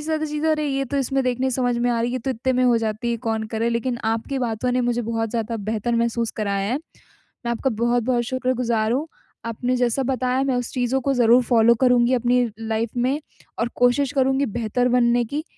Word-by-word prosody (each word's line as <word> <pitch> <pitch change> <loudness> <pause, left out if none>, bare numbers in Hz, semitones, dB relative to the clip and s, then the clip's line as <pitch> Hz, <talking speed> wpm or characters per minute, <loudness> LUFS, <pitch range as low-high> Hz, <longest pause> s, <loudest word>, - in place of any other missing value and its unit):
ज़्यादा 310 0 -1
चीज़ें 300 +1 -2
अरे 305 -1 0
ये 275 -1 -1
तो 275 +2 -4
इसमें 270 0 0
देखने 255 +1 0
समझ 245 -1 0
में 245 +1 +1
आ 235 -1 0
रही 235 - 0
है - - -5
ये 255 - -1
तो 260 +2 -3
इतने 260 +1 -1
में 255 0 +2
हो 245 -2 +4
जाती 225 +1 -2
है, 235 - 0
कौन 225 -1 -2
करे? 225 +1 0
लेकिन 235 +1 -1
आपकी 225 +5 -1
बातों 245 0 -1
ने 255 - +1
मुझे 240 0 0
बहुत 225 0 -2
ज़्यादा 230 0 -2
बेहतर 225 +2 -1
महसूस 235 0 0
कराया 200 0 -1
है। 265 - 0 0.7
मैं - - 0
आपका 265 +3 -1
बहुत-बहुत 240 +2 +1
शुक्रगुज़ार 245 -3 0
हूँ। 290 +6 -1 0.4
आपने 245 +2 -1
जैसा 245 +1 +1
बताया 255 0 0
मैं 270 -2 0
उस 245 -1 -3
चीज़ों 255 +1 0
को 275 +2 0
ज़रूर 245 0 +5
फॉलो 235 0 +4
करूँगी 250 -1 +4
अपनी 245 0 +2
लाइफ़ 225 +2 -2
में 265 +5 +1 0.4
और 230 - 0
कोशिश 260 +3 +2
करूँगी 270 0 +2
बेहतर 235 +2 -1
बनने 240 -1 +3
की, 290 +7 -4
245 Hz, 215 wpm, -22 LUFS, 230-260 Hz, 0.7 s, ज़रूर